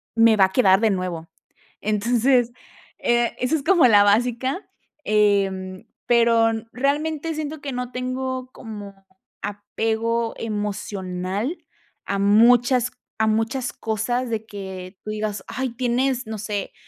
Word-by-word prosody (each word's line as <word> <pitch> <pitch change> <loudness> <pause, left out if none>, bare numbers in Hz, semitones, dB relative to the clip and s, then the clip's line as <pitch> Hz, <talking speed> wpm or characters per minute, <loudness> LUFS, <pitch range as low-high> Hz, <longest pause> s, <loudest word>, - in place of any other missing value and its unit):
me 225 -1 +5
va 190 - +7
a 190 - -4
quedar 190 -4 +5
de 220 -2 +3
nuevo. 180 -3 -3 0.5
Entonces, 240 +3 +2 0.5
eh, 240 0 +1
eso 250 +6 +1
es 280 - -2
como 345 -8 +5
la 205 -3 +6
básica, 245 - +1 0.3
em, 195 -3 +1 0.2
pero 230 -1 +4 0.2
realmente 300 +4 -1
siento 310 0 -5
que 280 - -4
no 250 0 -4
tengo 255 0 -3
como 200 -4 -10 0.4
apego 225 +3 -2
emocional 205 - -3 0.5
a 200 0 -2
muchas 240 +4 +4 0.3
a 220 - +3
muchas 225 +4 0
cosas 235 +3 -2
de 220 -1 -3
que 190 -2 -8
tú 215 - -7
digas: 210 -2 -3
"Ay, 260 0 -3
tienes 250 +1 0
no 220 -1 -4
sé, 205 -2 -4
225 Hz, 130 wpm, -23 LUFS, 205-250 Hz, 0.5 s, va